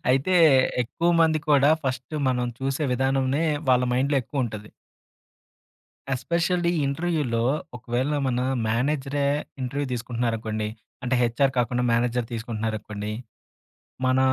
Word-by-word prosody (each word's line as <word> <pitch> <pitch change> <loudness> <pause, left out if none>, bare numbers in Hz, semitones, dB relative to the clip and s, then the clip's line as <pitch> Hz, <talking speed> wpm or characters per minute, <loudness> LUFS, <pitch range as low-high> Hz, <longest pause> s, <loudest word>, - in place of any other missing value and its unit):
అయితే 135 +8 +2 0.5
ఎక్కువ 165 +8 0
మంది 160 -1 +4
కూడా 145 0 +5
ఫస్టు 130 +3 -3
మనం 125 -1 0
చూసే 135 +3 -1
విధానంనే 135 +3 +1 0.3
వాళ్ళ 125 0 +4
మైండ్‌లో 140 +3 +1
ఎక్కువుంటది. 110 -5 -4 1.4
ఎస్పెషల్లీ 170 +5 0 0.2
ఇంటర్‌వ్యులో 140 -6 -1 0.3
ఒకవేళ 125 +4 -2
మన 125 -1 0 0.3
మేనేజరే 140 +4 0 0.4
ఇంటర్‌వ్యూ 140 +3 -2
తీసుకుంటున్నారనుకోండి, 115 -3 -2 0.3
అంటే 125 +1 0
హెచ్ఆర్ 130 +3 +2
కాకుండా 125 +1 +1
మేనేజర్ 120 0 +1
తీసుకుంటున్నారనుకోండి, 110 -2 -4 0.9
మన 130 0 +3
130 Hz, 100 wpm, -25 LUFS, 115-140 Hz, 1.4 s, కూడా